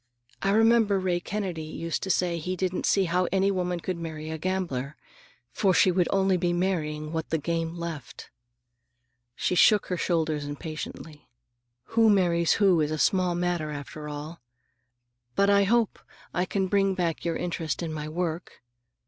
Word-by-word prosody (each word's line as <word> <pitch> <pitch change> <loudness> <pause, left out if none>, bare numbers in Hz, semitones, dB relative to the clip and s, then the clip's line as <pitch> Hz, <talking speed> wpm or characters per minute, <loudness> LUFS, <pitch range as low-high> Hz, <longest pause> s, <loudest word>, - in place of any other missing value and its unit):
I 195 - +1
remember 220 -1 +4
Ray 180 -2 0
Kennedy 185 -3 -4
used 160 +1 -4
to 190 - -4
say 175 -2 +1
he 180 +4 -3
didn't 185 0 -1
see 195 - +3
how 180 0 +1
any 195 +1 +2
woman 180 -2 -1
could 180 +1 -3
marry 160 -1 -6
a 160 - -3
gambler, 155 -7 -2 0.6
for 190 - +2
she 185 - +5
would 180 -1 +2
only 195 -1 +2
be 175 0 0
marrying 155 -4 -1
what 160 -1 -3
the 160 - +1
game 165 +2 -2
left." 165 -6 -7 1.0
She - - -1
shook 205 +3 +5
her - - -1
shoulders 160 -4 0
impatiently. 150 +1 -7 0.6
"Who 225 -1 +5
marries 175 -4 +3
who 190 -5 +4
is 150 - +1
a 155 - -2
small 180 +2 +2
matter, 175 -3 -1
after 150 +1 -7
all. 150 +2 -7 0.9
But 200 0 +4
I 200 0 +5
hope 230 +1 +1 0.3
I 180 - +1
can 195 0 -1
bring 195 0 +2
back 170 -3 -1
your 170 -1 -1
interest 170 -1 -3
in 160 -2 -3
my 155 0 -5
work. 165 -2 -4
175 Hz, 165 wpm, -27 LUFS, 160-190 Hz, 1.0 s, she